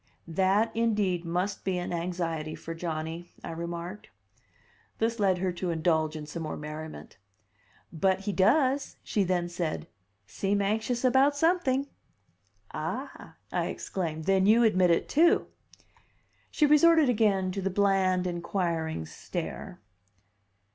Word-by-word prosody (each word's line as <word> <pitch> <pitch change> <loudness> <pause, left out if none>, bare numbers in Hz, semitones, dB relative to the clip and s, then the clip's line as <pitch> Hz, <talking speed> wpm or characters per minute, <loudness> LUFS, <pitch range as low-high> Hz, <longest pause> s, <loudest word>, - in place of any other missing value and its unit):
"That, 195 +6 +1
indeed, 205 -6 +1
must 180 +4 -2
be 190 -2 -1
an 175 0 -3
anxiety 165 -3 -3
for 165 - -7
Johnny," 165 0 -5
I - - -5
remarked. 170 +4 -6 0.9
This 230 +1 0
led 190 -3 +3
her 185 0 -1
to 175 +1 -4
indulge 160 -2 +1
in 155 -1 -6
some 160 +3 -6
more 155 - -4
merriment. 150 -6 -8 0.7
"But 190 +3 +1
he 205 - -2
does," 260 +8 +2
she 205 - 0
then 175 -1 0
said, 175 -2 -3 0.4
"seem 200 - -1
anxious 220 +5 0
about 265 +3 +4
something." 285 -4 +2 0.9
"Ah," - - -5 0.2
I - - 0
exclaimed. 160 -4 -4
"Then 190 +2 +3
you 230 +3 +6
admit 185 -5 +4
it, 170 - +2
too!" 330 +4 +4 1.0
She 305 - +2
resorted 315 +1 +6
again 205 -6 +2
to 195 +1 -3
the 195 - 0
bland, 190 -2 +2
inquiring 170 - -2
stare. - - -6
185 Hz, 130 wpm, -28 LUFS, 170-220 Hz, 1.0 s, you